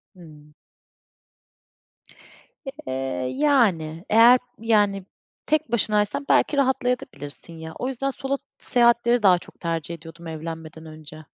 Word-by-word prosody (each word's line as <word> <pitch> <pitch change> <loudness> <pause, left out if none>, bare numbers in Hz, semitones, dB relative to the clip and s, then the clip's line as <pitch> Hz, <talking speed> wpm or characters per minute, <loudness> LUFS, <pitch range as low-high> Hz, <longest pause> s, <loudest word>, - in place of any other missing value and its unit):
Hımm. 150 -4 -16 2.1
Eee, 265 - -7 0.4
yani. 195 - +2
Eğer 235 +3 +7 0.2
yani 205 -4 +1 0.4
tek 310 -5 0
başınaysan, 215 +3 0
belki 290 - +3
rahatlayabilirsin 245 - -2
de 160 - -9
ya. 160 - -7
O 255 - -2
yüzden 270 +1 -2
solo 275 0 -3 0.2
seyahatleri 235 -1 +3
daha 185 -3 +6
çok - - -16
tercih 165 -1 -3
ediyordum, 165 +1 -12
evlenmeden 160 0 -7
önce. 155 0 -11
200 Hz, 110 wpm, -23 LUFS, 160-245 Hz, 2.1 s, Eğer